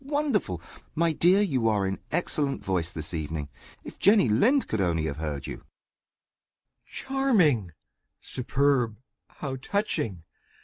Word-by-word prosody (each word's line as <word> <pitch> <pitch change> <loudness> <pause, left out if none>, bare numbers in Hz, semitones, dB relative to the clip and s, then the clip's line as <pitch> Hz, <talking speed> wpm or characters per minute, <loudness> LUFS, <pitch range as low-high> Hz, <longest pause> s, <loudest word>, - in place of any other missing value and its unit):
wonderful! 275 - -1 0.4
My 165 0 +2
dear, 180 +6 +4
you 135 - +1
are 105 -3 +1
in 95 0 -2
excellent 145 -5 -1
voice 90 -3 -1
this 80 +1 -5
evening. 80 -2 -4 0.3
If - - -11
Jenny 200 - +5
Lind 250 - +3
could 110 - -1
only 85 -3 +1
have 70 -2 -3
heard 75 -3 -4
you! - - -6
MR. - - -18
PIOUS. - - -28 1.3
Charming! 190 - +2 0.5
superb! 130 -3 0 0.3
how 135 -3 -6
touching! 140 - -2
125 Hz, 135 wpm, -27 LUFS, -, 1.3 s, Jenny